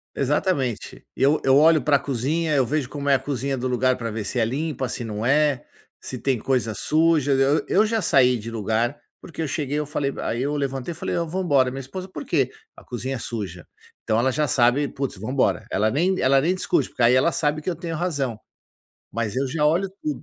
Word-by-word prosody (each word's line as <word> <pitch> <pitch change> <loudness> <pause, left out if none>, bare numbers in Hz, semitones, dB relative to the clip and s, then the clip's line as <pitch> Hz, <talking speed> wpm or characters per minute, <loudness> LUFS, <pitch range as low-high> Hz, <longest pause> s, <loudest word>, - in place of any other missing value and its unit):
Exatamente. 140 - -1
Eu 140 +4 +2
eu 135 0 +5
olho 155 +1 +5
para 145 -2 +3
cozinha, 145 +5 -1
eu 130 - +4
vejo 145 0 -1
como 145 +1 -4
é 140 - +6
a - - +3
cozinha 135 0 -3
do 130 +1 -2
lugar 125 +1 +2
para 115 -2 -4
ver 110 0 -4
se 125 +6 -3
é 115 - +3
limpa, 135 +2 -2
se 120 - -5
não 105 0 -4
é, 140 0 +2 0.4
se 130 - -6
tem 135 -1 0
coisa 120 -2 0
suja, 155 +1 +2
eu 135 +3 +3
eu 210 +3 +4
já 225 +1 0
saí 125 - +4
de 115 +1 -7
lugar, 115 +4 -1 0.2
porque 165 - -7
eu 155 - -2
cheguei 145 0 -2
eu 150 - -2
falei 140 -1 -2
aí 120 +3 -2
eu 145 +2 -1
levantei 135 +2 -3
e - - -8
falei: - - -4
"Não 170 -1 -1
vamos 185 +3 -2
embora", 130 -4 +3
minha 135 - -6
esposa: 185 +9 -7
"Por 185 - -7
quê"? 135 -6 +1 0.3
"A - - -14
cozinha 130 +2 -4
é - - -5
suja". 100 -8 -6 0.4
Então 110 +1 0
ela 130 +3 +2
já 150 0 0
sabe, 125 +4 +2
vamos 135 -5 -3
embora. 130 +4 0
Ela 110 +3 +1
nem 180 +8 +1
ela 135 +1 +4
nem 175 +6 +1
discute 185 - 0
porque - - -4
aí 120 +2 +6
ela 130 +6 +4
sabe 150 0 0
que 170 - -7
eu 170 - -4
tenho 165 -2 -5
razão. 145 -10 -2 0.7
Mas 115 0 -2
eu 135 +1 +1
já 150 +2 0
olho 175 +6 +2
tudo. 305 -1 -3
135 Hz, 230 wpm, -23 LUFS, 125-155 Hz, 0.7 s, é